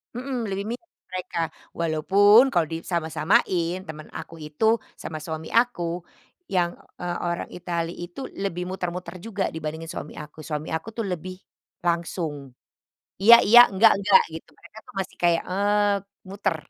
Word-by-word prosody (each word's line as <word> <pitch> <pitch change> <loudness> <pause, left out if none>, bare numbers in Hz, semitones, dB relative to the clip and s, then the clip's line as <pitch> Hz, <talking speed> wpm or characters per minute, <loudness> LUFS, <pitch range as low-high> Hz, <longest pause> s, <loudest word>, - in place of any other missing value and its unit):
Mhm, 255 +1 -3
lebih 195 +1 -3
mirip 340 +7 -22 0.2
mereka. 180 -1 -5 0.4
Walaupun, 200 - +5
kalau 170 -3 +2
disama-samain 170 +2 0
teman 155 -1 -8
aku 165 - -9
itu 150 +8 -2 0.3
sama 160 - -6
suami 160 0 -5
aku 175 -8 -1 0.5
yang, 175 -2 +1 0.2
eee, 175 0 -3
orang 170 0 -2
Italy 170 -1 -3
itu 175 +5 -9 0.2
lebih 180 -3 -2
muter-muter 180 -1 -5
juga 205 -4 -2
dibandingin 160 +1 -5
suami 155 - -7
aku. 150 +1 -10
Suami 150 0 -4
aku 160 - -5
tuh 230 - -1
lebih 185 +1 -5 0.5
langsung, 165 -5 -2 0.7
iya, 230 +4 +10
iya, 235 +4 +9
enggak, 215 +4 +6
enggak 200 -1 +6
gitu. 160 - -8
Mereka 175 +5 -16
tuh - - -14
masih 190 0 -5
kayak, 170 -1 +3
eee, 205 +1 +2 0.3
muter. 195 -3 -1
175 Hz, 145 wpm, -25 LUFS, 165-200 Hz, 0.7 s, iya